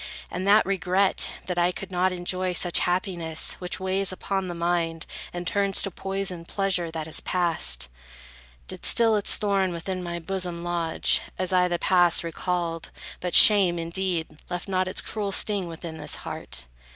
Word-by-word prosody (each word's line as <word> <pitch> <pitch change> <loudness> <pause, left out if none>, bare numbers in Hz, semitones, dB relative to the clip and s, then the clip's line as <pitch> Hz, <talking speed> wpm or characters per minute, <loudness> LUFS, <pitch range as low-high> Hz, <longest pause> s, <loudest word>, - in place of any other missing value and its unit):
And 185 +2 -4
that 210 +2 +6
regret, 190 0 +1
that 180 -1 -2
I 175 +1 +3
could 195 +1 -8
not 185 +1 +1
enjoy 185 +1 -2
Such 175 0 +2
happiness, 175 -3 0
which 180 -1 -4
weighs 190 +1 0
upon 190 0 -3
the 175 - -5
mind, 170 -1 -1 0.3
And 175 0 -6
turns 200 +1 0
to 195 - -3
poison 195 -2 -4
pleasure 185 -2 -1
that 160 -1 -5
has 160 - -1
passed, 165 - +1 0.8
Did - - -6
still 225 -2 +6
its 205 - +3
thorn 195 -3 0
within 185 +2 -4
my 170 -1 -4
bosom 175 0 -3
lodge, 170 -2 +2 0.2
As 185 0 0
I 180 -1 +4
the 175 -1 -1
past 175 -2 +3
recalled; 170 0 -3 0.3
but 180 -1 -1
shame, 195 -5 +8
indeed, 170 -2 -3
Left 175 +2 -5
not 185 -1 0
its 185 - -2
cruel 205 -2 -3
sting 200 -2 +1
within 165 -1 -8
this 150 -1 -3
heart. 60 - -5
180 Hz, 165 wpm, -25 LUFS, 170-190 Hz, 0.8 s, shame